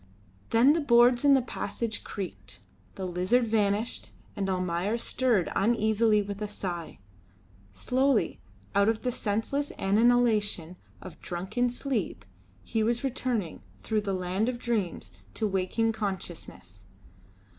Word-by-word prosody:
Then 245 +6 +5
the 330 - +1
boards 240 -2 +5
in 285 -1 +7
the 265 - +2
passage 230 -1 -4
creaked, 195 -3 -7 0.4
the 190 - -4
lizard 185 +7 +1
vanished, 215 0 0 0.3
and 195 -2 -2
Almayer 185 +3 0
stirred 235 -5 +1
uneasily 220 0 +3
with 200 +1 -6
a 210 - -1
sigh: 180 -5 -5 0.7
slowly, 260 - +1 0.3
out 200 +1 +4
of 225 -1 -1
the 250 - 0
senseless 235 +7 -2
annihilation 210 -4 +2 0.3
of 180 -4 -11
drunken 190 +8 -1
sleep, 240 - -3 0.4
he 225 - -1
was 235 +3 0
returning, 245 - -2 0.2
through 215 -1 0
the 200 -2 -2
land 185 +5 -1
of 250 - -3
dreams, 215 - -2 0.2
to 215 - 0
waking 200 +4 0
consciousness. 180 - -6
215 Hz, 125 wpm, -28 LUFS, 190-240 Hz, 0.7 s, in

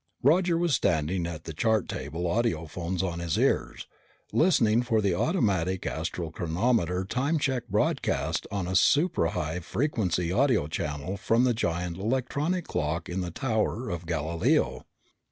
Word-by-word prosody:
Roger 170 +5 +4
was 170 -2 +1
standing 85 - +1
at 80 -2 -6
the 80 - -6
chart 110 +5 +1
table, 75 +6 -5
audiophones 85 -2 -1
on 85 -2 -2
his 85 -2 -1
ears, - - 0 0.5
listening 120 -10 +4
for 115 -2 +1
the 100 -3 +1
automatic 95 - 0
astral 80 0 -3
chronometer 90 +2 0
time 140 - 0
check 130 -4 -1
broadcast - - 0
on 100 -3 -2
a 90 - -3
suprahigh 90 - +2
frequency 90 - -1
audio 125 - +3
channel 75 +4 -3
from 115 +5 +2
the 125 -1 +3
giant 85 -5 -2
electronic 140 - -1
clock 80 +3 -2
in 90 +2 -2
the 90 - -3
Tower 110 - -1
of 85 -1 -5
Galileo. 80 -6 0
95 Hz, 140 wpm, -27 LUFS, 85-120 Hz, 0.5 s, Roger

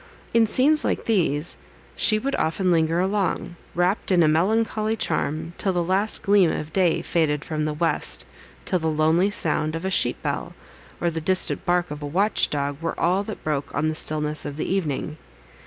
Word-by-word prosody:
In 230 -1 +4
scenes 290 +7 +3
like - - -1
these 170 -7 0 0.4
she 215 - +3
would 275 +6 -2
often 180 +3 0
linger 165 0 +2
along, 190 -2 -1 0.2
wrapt 180 +4 0
in 175 -2 +5
a - - +4
melancholy 215 +6 +1
charm, 160 -3 -2
till 190 - +1
the 175 -1 0
last 195 +5 +1
gleam 200 -4 +4
of 155 +1 -5
day 180 -4 +2
faded 150 -3 0
from 155 -1 -2
the 155 - -1
west; 165 +2 0 0.4
till 185 - 0
the 160 - -2
lonely 160 +5 +2
sound 155 -5 0
of 165 +3 -5
a 190 - -1
sheep - - +1
bell, - - -3 0.4
or 170 - 0
the 160 0 -4
distant 185 +3 0
bark 175 -2 +1
of 150 0 -6
a 145 - -4
watch 195 +8 +1
dog, 145 0 -3
were 165 - -3
all 180 +3 +2
that 215 - -7
broke 150 -2 -3
on 155 - +1
the - - -1
stillness 150 -1 0
of 145 0 -6
the - - -2
evening. 155 -4 -2
170 Hz, 190 wpm, -23 LUFS, 155-195 Hz, 0.4 s, in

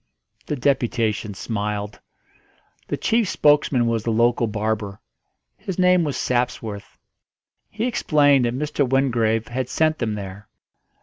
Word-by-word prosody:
The 150 - -1
deputation 115 -6 0
smiled. 105 -1 -4 0.9
The - - -2
chief 225 -3 +1
spokesman 145 -7 +3
was 115 -1 0
the 115 - -3
local 115 +1 +2
barber; 105 -1 -3 0.6
his 190 - -5
name 180 -1 +4
was 145 -3 -2
Sapsworth. 115 -4 -2 0.7
He 220 +3 -3
explained 145 - +3
that 120 +1 -1
Mr. 150 0 -1
Wingrave 115 -4 +1
had 125 +1 -3
sent 155 0 +1
them 110 -3 -1
there. 100 0 -8
120 Hz, 125 wpm, -22 LUFS, 110-145 Hz, 0.9 s, name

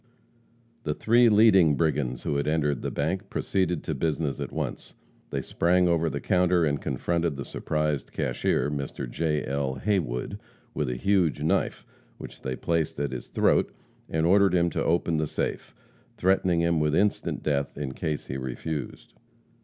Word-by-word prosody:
The 75 -1 -2
three 120 +1 +4
leading 100 -8 +6
brigands 70 -6 0
who 70 - -1
had 70 - -1
entered 75 -4 +1
the - - -2
bank 95 +7 -2
proceeded 95 -3 -1
to 80 - -2
business 75 0 -1
at - - -4
once. - - -5 0.3
They - - -3
sprang 90 +1 +2
over 85 -1 +2
the 70 -1 -3
counter 90 0 +2
and 70 -2 -1
confronted 85 -3 -1
the 70 - -5
surprised 75 -2 -2
cashier, 65 +3 0
Mr. 70 -2 -4
J. 75 +3 -1
L. 70 0 -1
Haywood, 75 - -1 0.3
with 75 -4 -1
a 60 - -2
huge 85 -1 +1
knife, 80 - 0 0.3
which - - -10
they 65 -1 -3
placed 80 -2 -1
at 70 -2 -1
his 65 -2 -6
throat, - - +2 0.4
and 80 0 0
ordered 95 +1 +4
him 85 -1 +2
to - - -1
open 85 -1 +1
the 80 0 0
safe, - - -3 0.4
threatening 90 -2 +2
him 85 -1 +2
with 75 0 +1
instant 105 +3 0
death 70 -2 -1
in 70 -2 -3
case 75 +2 -3
he 65 - -4
refused. 70 +4 -5
80 Hz, 165 wpm, -26 LUFS, 70-85 Hz, 0.4 s, leading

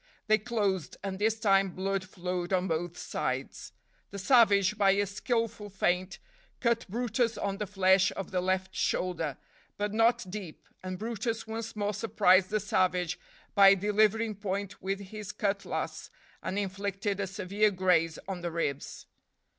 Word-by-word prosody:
They 215 0 +4
closed, 200 -7 -1
and 195 -1 -4
this 220 +1 +1
time 195 -3 +3
blood 195 0 -1
flowed 180 -1 -4
on 185 0 +1
both 170 +1 -2
sides. - - -4 0.4
The 200 - -7
savage, 205 -3 +4
by 195 -2 +4
a 205 +1 +1
skillful 220 +1 -2
feint, 185 -1 0 0.4
cut 235 -1 +1
brutus 230 +1 0
on 200 0 -2
the 210 - -2
flesh 190 -1 +4
of 195 - -5
the 180 -1 0
left 190 +1 -1
shoulder, 165 -6 -1 0.4
but 205 0 -2
not 225 0 +3
deep, 185 -4 -8
and 185 0 -5
brutus 225 +2 -3
once 225 0 -5
more 205 0 -1
surprised 195 -3 +3
the 215 - +1
savage 185 -3 0 0.3
by 195 -1 +8
delivering 215 +3 +2
point 200 -1 -4
with 195 +1 -2
his 210 +1 -7
cutlass, 200 -1 -3 0.3
and 190 - -3
inflicted 200 0 -2
a 200 - -1
severe 200 +2 +1
graze 180 -4 +2
on 190 -2 -4
the 175 - -2
ribs. 145 -4 -3
195 Hz, 150 wpm, -30 LUFS, 185-215 Hz, 0.4 s, by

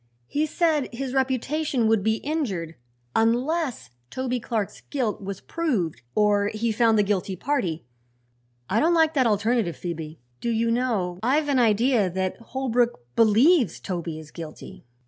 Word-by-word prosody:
He 300 - -1
said 310 -3 +1
his 255 +1 -4
reputation 265 0 0
would 220 -2 +3
be 220 +1 +2
injured 215 - -2 0.4
unless 250 - 0 0.2
Toby 255 -1 -2
Clark's 220 -3 -3
guilt 245 -9 -1
was 195 -1 -6
proved 245 - -2
or 205 -1 +3
he 220 +2 -1
found 225 0 +3
the 210 - +4
guilty 195 -1 -1
party. 180 - -2 0.8
I 215 - +1
don't 335 +3 +3
like 320 -1 +4
that 260 -5 +3
alternative, 215 -3 +1
Phoebe. 160 -3 -6 0.2
Do 235 - -2
you 230 0 +1
know, 220 -8 0
I've 290 +5 +1
an 270 -2 +3
idea 230 -2 +3
that 185 +1 -2
Holbrook 240 - 0
believes 230 - +4
Toby 170 -4 -4
is 155 -1 -11
guilty?" 160 -6 -10
230 Hz, 145 wpm, -25 LUFS, 195-265 Hz, 0.8 s, the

